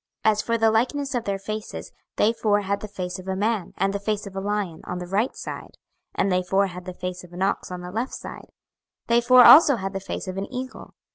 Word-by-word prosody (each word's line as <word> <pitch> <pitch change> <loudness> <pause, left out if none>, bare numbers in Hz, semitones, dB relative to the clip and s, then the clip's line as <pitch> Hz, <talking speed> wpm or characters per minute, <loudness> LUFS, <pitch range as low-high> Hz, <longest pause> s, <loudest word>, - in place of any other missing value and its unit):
26:001:010 220 - +7
As 210 0 -1
for 230 0 0
the 225 -1 +3
likeness 275 +5 0
of 245 -2 -1
their 200 -1 -1
faces, 215 +2 -6 0.2
they 220 +2 +3
four 210 -2 +1
had 200 0 -1
the 215 - -7
face 180 -3 -5
of 185 - -11
a 190 - -1
man, 210 -1 -1
and 195 +1 +1
the 200 - -2
face 210 +1 -2
of 195 -1 -9
a - - -2
lion, 200 -4 -2
on 180 - -4
the 180 - -5
right 205 +8 0
side: - - -8 0.4
and 195 - +1
they 180 0 +2
four 195 +2 +2
had 180 -1 -8
the 185 - -6
face 180 0 -5
of 175 -1 -15
an 180 +2 -2
ox 195 - -1
on 180 0 -5
the 180 0 -7
left 230 +6 -3
side; - - -9 0.6
they 235 +1 +3
four 250 +1 +7
also 290 -2 +9
had 195 -3 -4
the 195 - -2
face 195 - -6
of 185 0 -5
an 195 - -4
eagle. 260 +1 -7
200 Hz, 260 wpm, -24 LUFS, 185-225 Hz, 0.6 s, also